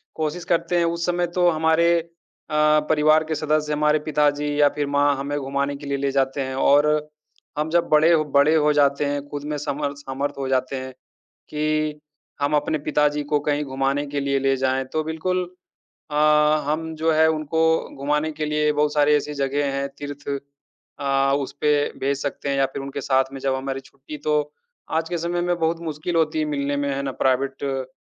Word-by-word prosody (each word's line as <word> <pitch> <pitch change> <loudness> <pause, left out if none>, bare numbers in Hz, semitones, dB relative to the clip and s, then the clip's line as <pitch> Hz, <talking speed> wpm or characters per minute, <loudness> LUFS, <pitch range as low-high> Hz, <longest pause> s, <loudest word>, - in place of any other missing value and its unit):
कोशिश 160 +2 -3
करते 175 +1 +1
हैं 170 - +3
उस 170 0 -1
समय 175 0 0
तो 180 -1 +4
हमारे 160 +1 +3 0.6
अ, 150 0 +4
परिवार 155 0 +4
के 160 - 0
सदस्य, 150 0 0
हमारे 150 +1 +2
पिताजी 150 -1 +1
या 145 - +6
फिर 145 -1 -1
माँ, 145 0 +2
हमें 140 +1 -3
घुमाने 140 0 -2
के 145 +1 -10
लिए 140 0 -1
ले 140 0 -1
जाते 135 0 0
हैं 130 0 -3
और 145 +2 +4 0.7
हम 150 +1 -1
जब 170 +1 +2
बड़े 155 +2 +5
ह 155 -2 +3
बड़े 145 +3 +5
हो 150 -1 +3
जाते 140 0 +2
हैं, 145 0 -1
ख़ुद 145 0 -5
में 150 0 -3
समर्थ 145 0 -3
समर्थ 140 0 -4
हो 135 -1 -3
जाते 130 0 0
हैं 130 0 -5 0.6
कि 155 0 -1 0.4
हम 145 +1 +1
अपने 155 +1 0
पिताजी 150 0 +1
को 150 - +4
कहीं 145 0 +1
घुमाने 135 +1 -1
के 140 0 -3
लिए 140 0 0
ले 135 0 +1
जाएँ, 130 0 0
तो 155 +4 -2
बिल्कुल 170 +4 -1 0.7
अ, - - -3 0.5
हम 160 +2 -2
जो 160 +1 +1
है 160 +1 +5
उनको 160 0 -1 0.4
घुमाने 150 +3 0
के 155 0 -4
लिए 150 0 +1
बहुत 150 0 +1
सारी 150 0 +4
ऐसी 150 0 -2
जगह 140 0 -1
हैं, 140 0 -1
तीर्थ 145 0 -8 0.7
अ, 135 -1 +1
उसपे 145 +2 -1 0.3
भेज 140 +1 0
सकते 145 0 -4
हैं 140 - 0
या 135 - +3
फिर - - -4
उनके 140 +1 -5
साथ 130 0 +2
में 135 - -6
जब 135 -1 0
हमारी 135 0 -4
छुट्टी 140 +2 -11
तो, 150 0 0 0.4
आज 160 +1 -1
के 175 - -1
समय 175 +1 -2
में 175 0 0
बहुत 165 +1 0
मुश्किल 160 +1 -4
होती 160 -1 +1
है 155 - +1
मिलने 145 -1 -2
में, 140 0 -1
है 140 - -2
ना, 135 - -2
प्राइवेट 135 0 0
145 Hz, 200 wpm, -23 LUFS, 140-155 Hz, 0.7 s, या